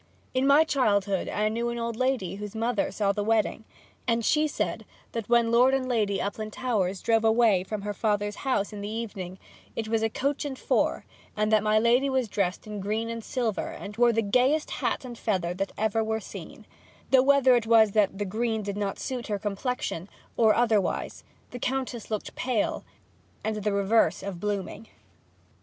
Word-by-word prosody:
In 260 +1 +2
my 285 +3 +7
childhood 200 - +1
I 210 +1 0
knew 235 +2 -1
an 235 - -3
old 235 -1 -3
lady 250 -7 -1
whose 210 +1 -7
mother 225 -1 0
saw 200 -2 0
the 205 +1 -2
wedding, 220 0 0 0.4
and 230 -1 +1
she 310 0 +3
said 295 - -2 0.3
that 230 -2 -5
when 235 -1 +4
Lord 250 +3 +5
and 260 -1 -1
Lady 215 -5 +1
Uplandtowers 210 -2 -2
drove 225 -1 +3
away 220 -4 +4
from 205 +1 -5
her 205 0 -3
father's 205 -1 -1
house 240 -6 -1
in 205 - -6
the 205 - -4
evening 205 -5 -5 0.4
it 225 - -3
was 225 0 +1
in 225 - +2
a - - -8
coach 280 +5 -1
and 280 -3 -4
four, - - 0 0.3
and 215 +1 +1
that 215 -1 +5
my 215 0 +2
lady 240 +5 +3
was 260 -3 +1
dressed 195 -1 -1
in 210 -1 -6
green 215 +4 -2
and 230 -1 -5
silver, 235 -5 -2
and 205 +1 -8
wore 240 0 +5
the 225 0 +1
gayest 255 +9 +2
hat - - -2
and 240 -2 -8
feather 180 -5 -1
that 195 +2 -3
ever 220 +1 +1
were 220 0 -1
seen; - - -10 0.5
though 265 -1 +7
whether 265 -1 +5
it 235 -2 0
was 220 -2 +6
that 200 -2 +2
the 205 - -2
green 220 +2 -1
did 200 0 -4
not 200 -1 -2
suit 250 -2 -4
her 210 -2 -1
complexion, 200 -3 -3 0.3
or 220 -2 +4
otherwise, 225 -5 0 0.3
the 245 - -7
Countess 255 -2 -3
looked 215 -2 -4
pale, 245 -5 -1 0.6
and 220 0 -1
the 210 0 -1
reverse 200 -3 +2
of 195 -3 -5
blooming. 205 +2 -4
220 Hz, 190 wpm, -27 LUFS, 205-240 Hz, 0.6 s, my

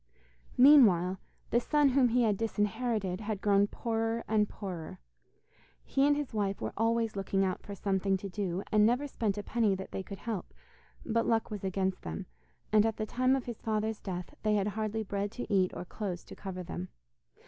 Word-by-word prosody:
Meanwhile, 200 - +6 0.3
the 235 - +4
son 295 +3 +3
whom 260 -1 +4
he 245 +1 +3
had 215 -3 +3
disinherited 215 -2 -1
had 210 -1 -3
grown 200 0 +3
poorer 225 +1 -2
and 210 -1 +2
poorer. 180 -6 -6 0.9
He 275 +1 +2
and 290 0 +3
his 290 -5 -4
wife 200 -2 -1
were - - -4
always 225 0 +1
looking 195 0 0
out 185 -1 -2
for 200 - -8
something 195 0 0
to 200 - -6
do, 190 -1 -3
and 210 -1 +5
never 245 +6 +3
spent 220 -7 -2
a 205 - -3
penny 215 -2 +1
that 190 0 -7
they - - -3
could 195 +1 -8
help, 210 -1 -5 0.5
but 230 -1 +1
luck 225 -1 +1
was 205 -2 -5
against 190 0 -1
them, 195 - -5 0.5
and 210 -1 +6
at 225 -1 0
the 215 - -2
time 255 +4 +2
of 265 - -3
his 240 -3 -6
father's 220 0 -1
death 180 -2 -5
they 215 -1 +2
had 205 0 +1
hardly 215 +1 -2
bread 200 0 -2
to 245 -4 -4
eat 185 -2 +3
or - - -5
clothes 185 -2 -5
to - - -11
cover 185 -2 -6
them. 90 - -6
210 Hz, 195 wpm, -31 LUFS, 195-230 Hz, 0.9 s, Meanwhile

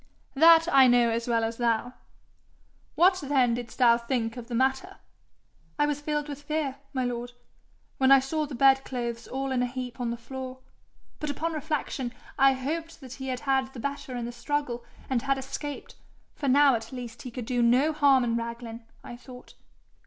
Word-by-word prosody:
'That 330 +3 +7
I 265 -1 +8
know 240 -1 +4
as 230 +1 -2
well 230 -1 +1
as 225 0 -2
thou. 240 +1 0 1.0
What 370 +2 +4
then 265 -4 +2
didst 240 -1 -6
thou 235 -2 +5
think 235 -1 -2
of 240 -2 -8
the 240 - -4
matter?' 265 +2 0 0.8
'I 295 - +3
was 295 -1 -2
filled 295 0 -2
with 290 -1 -7
fear, 290 -2 -2
my 260 -3 -1
lord, 245 0 -4 0.7
when 265 0 +4
I 275 - +9
saw 300 +3 -2
the 280 - -7
bedclothes 250 -3 +1
all 270 +1 -3
in 255 -1 +1
a 250 - +1
heap 250 0 -6
on 240 -1 -1
the 235 - -3
floor, 255 +2 -7 0.6
but 300 - -3
upon 325 +4 -2
reflection 295 -5 -3 0.2
I 270 -1 +5
hoped 315 +6 -4
that 260 -2 -9
he 265 0 -7
had 255 -1 -3
had 265 -1 0
the - - -7
better 280 0 -4
in 240 -1 -3
the 240 - -5
struggle, 245 0 -3 0.2
and 255 -3 0
had 275 +1 0
escaped; 275 +2 -6 0.4
for 285 - -4
now 280 +1 +6
at 225 -1 -3
least 245 -3 -8
he 250 - -7
could 245 -1 -6
do 245 0 0
no 255 +7 +3
harm 280 -4 +4
in 230 -1 0
Raglan, 235 0 -5 0.2
I 240 - -8
thought. 250 0 -13
260 Hz, 190 wpm, -27 LUFS, 240-280 Hz, 1.0 s, I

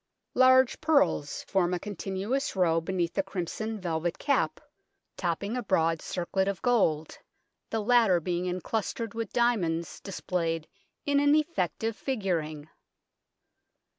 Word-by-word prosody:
Large 260 0 +5
pearls 285 - +2
form 180 -2 +1
a - - -3
continuous 205 +7 -3
row 165 -3 +3
beneath 175 0 -1
the 195 - +2
crimson 195 +4 -4
velvet 170 -2 -2
cap, 285 - +1 0.6
topping 190 +6 -2
a 250 - -1
broad 165 -6 +1
circlet 190 +2 -1
of 200 -2 -1
gold, 160 -11 +1 0.5
the 225 -1 -1
latter 225 -6 +4
being 175 +2 -2
enclustered 215 +5 -3
with 225 -3 -4
diamonds 185 -9 0
displayed 165 -4 -2 0.4
in 285 0 +3
an 290 +1 +5
effective 225 - 0
figuring. 170 - -2
190 Hz, 120 wpm, -28 LUFS, 170-235 Hz, 0.6 s, Large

